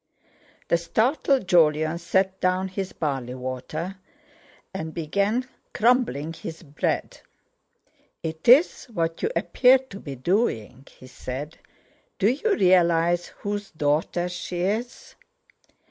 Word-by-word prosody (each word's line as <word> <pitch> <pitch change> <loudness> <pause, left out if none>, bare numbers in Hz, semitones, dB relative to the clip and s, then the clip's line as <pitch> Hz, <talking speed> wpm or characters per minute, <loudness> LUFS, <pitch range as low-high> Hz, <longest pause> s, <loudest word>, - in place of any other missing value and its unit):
The 170 - +4
startled 250 - +1
Jolyon 155 -2 +3
set 190 +2 0
down 185 +1 +1
his 190 0 -4
barley 135 -5 -3
water, 130 +8 -5 0.8
and 160 -4 -5
began 200 +10 0 0.3
crumbling 215 - +2
his 165 +1 -8
bread. 145 -2 -3 1.0
"It's 235 - +3
what 165 -6 -2
you - - +1
appear 255 +1 +5
to 260 -7 -11
be 140 -7 -7
doing," 135 - -1
he - - -16
said. 130 +4 -7 0.6
"Do 200 - +3
you 400 - 0
realise 175 -2 +3
whose 205 0 -5
daughter 155 +3 0
she 180 0 -5
is?" 220 +7 -3
175 Hz, 110 wpm, -25 LUFS, 155-205 Hz, 1.0 s, appear